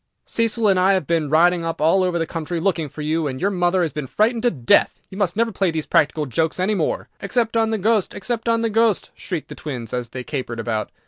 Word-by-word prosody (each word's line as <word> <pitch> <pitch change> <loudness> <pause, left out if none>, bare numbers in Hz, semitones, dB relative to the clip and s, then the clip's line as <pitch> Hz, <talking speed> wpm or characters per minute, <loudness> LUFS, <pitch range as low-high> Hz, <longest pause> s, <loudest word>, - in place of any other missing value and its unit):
"Cecil 230 -1 0
and 190 -2 +4
I 190 +2 +4
have 185 -5 0
been 160 -1 0
riding 170 +3 +4
all 165 +2 +2
over 180 -1 0
the 165 - 0
country 165 +1 -4
looking 165 -4 0
for 150 - -7
you, 155 +1 0
and 130 -1 -4
your 200 +2 +1
mother 180 -1 +1
has 160 - -2
been 150 -3 -4
frightened 225 - +1
to 245 - +3
death. 125 - +2
You 190 - -8
must 185 -4 0
never 230 0 +2
play 195 -3 0
these 160 -2 -3
practical 150 0 +2
jokes 160 +6 -1
any 190 +4 +1
more." 175 -7 -1
"Except 230 +3 -1
on 225 -1 +2
the 220 - 0
Ghost! 215 0 +1
except 230 +2 -3
on 230 0 +2
the 230 - +1
Ghost!" 225 -2 +2
shrieked 175 -6 -5
the - - -7
twins, 125 -7 -6
as 125 -1 -3
they 125 0 -6
capered 125 -4 -4
about. 110 -2 -2
175 Hz, 245 wpm, -21 LUFS, 155-210 Hz, -, and